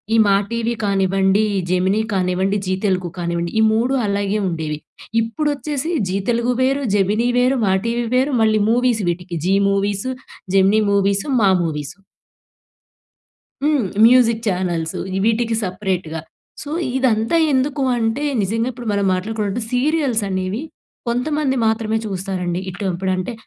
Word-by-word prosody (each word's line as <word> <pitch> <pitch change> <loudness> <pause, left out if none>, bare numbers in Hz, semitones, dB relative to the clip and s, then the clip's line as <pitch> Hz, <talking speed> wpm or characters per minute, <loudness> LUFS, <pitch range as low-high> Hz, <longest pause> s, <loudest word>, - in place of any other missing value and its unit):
ఈ - - +4
'మా 200 -1 +4 0.2
టీవీ' 235 0 -1
కానివ్వండి, 195 +1 +2 0.3
'జెమినీ' 190 +4 +1
కానివ్వండి 190 +2 0
'జీ 185 - +1
తెలుగు' 180 -3 -1
కానివ్వండి 170 0 -2
ఈ - - +4
3 240 +4 +1
అలాగే 200 +1 0
ఉండేవి. 155 -3 -3 0.4
ఇప్పుడొచ్చేసి 295 +5 -2 0.2
'జీ 190 - 0
తెలుగు' 235 +1 0
వేరు, 270 +2 +1
'జెమినీ' 210 +5 +2
వేరు, 255 +2 +2
'మా 190 - +2
టీవీ' 235 0 -1
వేరు, 265 +2 +2
మళ్ళీ 215 -1 +3
మూవీస్ 240 -3 +2
వీటికి 175 0 -4
'జీ 195 +1 +3 0.2
మూవీసు', 200 +5 -1 0.4
'జెమినీ 195 +3 +4
మూవీసు', 200 +6 +1
'మా 195 - +5
మూవీసు'. 150 +2 -4 1.6
హ్మ్. 295 -6 +2 0.2
మ్యూజిక్ 235 -2 +4
ఛానల్సు 175 -3 -2 0.2
ఇ - - +1
వీటికి 230 0 +1
సపరేట్‌గా. 180 -4 -3 0.4
సో, 290 - -8 0.3
ఇదంతా 240 +3 +1 0.2
ఎందుకూ 270 +2 0 0.2
అంటే? 225 +6 -1 0.2
నిజంగా 225 +5 -1
ఇప్పుడు 240 -2 -7
మనం 200 -1 0
మాట్లాడుకున్నట్టు 210 +3 -2
సీరియల్స్ 265 -3 +1
అనేవి 190 +6 -2 0.5
కొంతమంది 265 +2 0
మాత్రమే 220 0 0
చూస్తారండి. 185 -2 -3
ఇటు 190 +3 -7
ఇప్పుడంటే 185 +4 -2
210 Hz, 135 wpm, -20 LUFS, 190-245 Hz, 1.6 s, మా